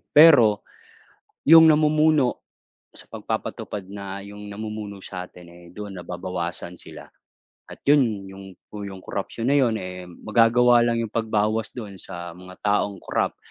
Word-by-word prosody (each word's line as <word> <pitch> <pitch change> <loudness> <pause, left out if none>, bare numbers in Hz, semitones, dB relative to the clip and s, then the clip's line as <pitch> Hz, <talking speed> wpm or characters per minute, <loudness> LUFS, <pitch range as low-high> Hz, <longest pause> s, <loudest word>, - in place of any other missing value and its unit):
pero 125 -10 +6 0.8
yung 160 +1 +9
namumuno 155 -3 +3 0.5
sa - - -13
pagpapatupad 100 -2 -5
na 100 -1 -6
yung 105 +1 -10
namumuno 105 -1 -7
sa 90 -1 -7
atin 90 -1 -15
eh, 85 0 -16
doon 100 -1 -8
nababawasan 90 0 -5
sila - - -11 0.7
at - - -11
yun 115 -9 +3
yung 95 0 -11 0.2
po 105 - -9 0.2
corruption 105 +3 -5
na 140 - +4
yun 115 -4 +2
eh, 90 0 -7
magagawa 120 +5 +3
lang 115 -1 +1
yung 110 - -8
pagbawas 110 -1 0
doon 105 -5 -7
sa 85 0 -8
mga 90 0 -12
taong 100 -1 +1
corrupt, - - -1
105 Hz, 140 wpm, -23 LUFS, 95-120 Hz, 0.8 s, yung